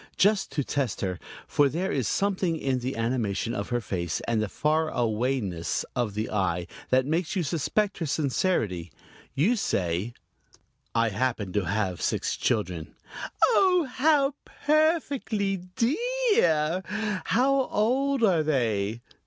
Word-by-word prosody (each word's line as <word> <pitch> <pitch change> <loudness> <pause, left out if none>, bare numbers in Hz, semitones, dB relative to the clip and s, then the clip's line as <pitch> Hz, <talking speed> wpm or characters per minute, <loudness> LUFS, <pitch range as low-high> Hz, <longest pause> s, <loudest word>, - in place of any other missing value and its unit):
Just 205 0 +3
to 145 - 0
test 135 -5 -2
her, 90 -2 -2 0.3
for 145 -1 +3
there 180 +7 -2
is 130 -5 0
something 190 -4 0
in 135 -4 0
the 130 +2 -3
animation 115 -2 -1
of 100 -4 -3
her 120 - +1
face 85 -6 -2
and 115 -2 0
the 110 - 0
farawayness 125 - 0
of 115 -5 -1
the 110 +1 -1
eye 90 -4 0 0.2
that 130 0 +3
makes 165 +5 -1
you 185 - +1
suspect 185 +8 0
her 165 - -2
sincerity, 120 - 0 0.4
you 180 - +3
say: 95 - -1 0.8
"I 115 0 +3
happen 110 -3 -1
to 105 -3 0
have 95 -1 -1
six - - 0
children 90 -7 -2 0.2
" - - +1
"Oh, 360 -7 +4
how 280 +1 +3 0.3
perfectly 285 - +2 0.2
dee 240 +6 +2 0.5
ar! 160 +2 +2 0.4
How 270 +2 +2
old 260 +4 +1
are 180 -7 +4
they?" 115 -7 0
135 Hz, 135 wpm, -27 LUFS, -, 0.8 s, Oh